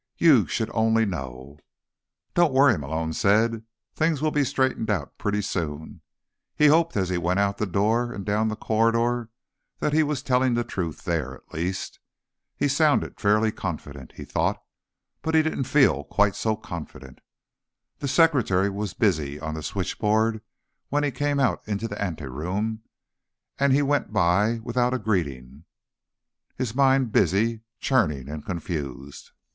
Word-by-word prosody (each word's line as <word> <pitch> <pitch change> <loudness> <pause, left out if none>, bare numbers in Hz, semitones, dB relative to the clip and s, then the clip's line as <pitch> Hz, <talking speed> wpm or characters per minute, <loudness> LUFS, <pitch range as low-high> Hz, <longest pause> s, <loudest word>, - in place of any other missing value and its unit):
You 145 - +5
should 110 - -2
only 115 0 +3
know." 65 - -6 0.7
"Don't 175 -4 +3
worry," 135 -3 +6
Malone 80 +1 -3
said. 110 +5 +2 0.3
"Things 160 -2 +1
will 155 +1 0
be 145 -1 +2
straightened 130 -4 0
out 90 -9 -2
pretty 105 0 -1
soon." 80 -5 -4 0.5
He 150 - +3
hoped, 165 -3 +3
as 95 -2 0
he 90 -1 0
went 90 +3 0
out 100 0 0
the 105 - 0
door 110 +6 +1
and 100 -4 -6
down 105 +2 +1
the 110 - -2
corridor, 115 +2 +1 0.5
that 150 - -1
he 160 - +4
was 145 -3 -1
telling 125 -2 +2
the 120 - +1
truth 85 -8 -5
there, 80 -7 -2
at - - -21
least. 90 +4 -3 0.6
He'd - - +1
sounded - - +2
fairly 110 +2 +3
confident, 70 -9 -6
he - - -9
thought, - - -1 0.6
but 160 0 -1
he 160 - +5
didn't 155 -4 -2
feel 130 - +3
quite 100 -1 +2
so 110 -1 0
confident. 85 - -9 0.8
The 140 - -3
secretary 125 - +3
was 100 -1 -4
busy 75 -1 0
on 80 0 -4
the 80 - -5
switchboard 105 +7 0 0.5
when 145 +1 +1
he 145 - 0
came 145 +3 -1
out 130 -5 +1
into 105 +1 -2
the 100 -2 -6
anteroom, 90 - -3 0.8
and 140 0 +3
he 140 +2 +4
went 145 -6 0
by 105 +4 +2
without 125 +1 0
a - - +1
greeting, 75 - -3 0.9
his 125 -4 -3
mind 135 -2 +3
busy, 105 +5 +2 0.2
churning 75 - +1
and 75 0 -6
confused. 75 -6 -6
105 Hz, 155 wpm, -25 LUFS, 85-125 Hz, 0.9 s, worry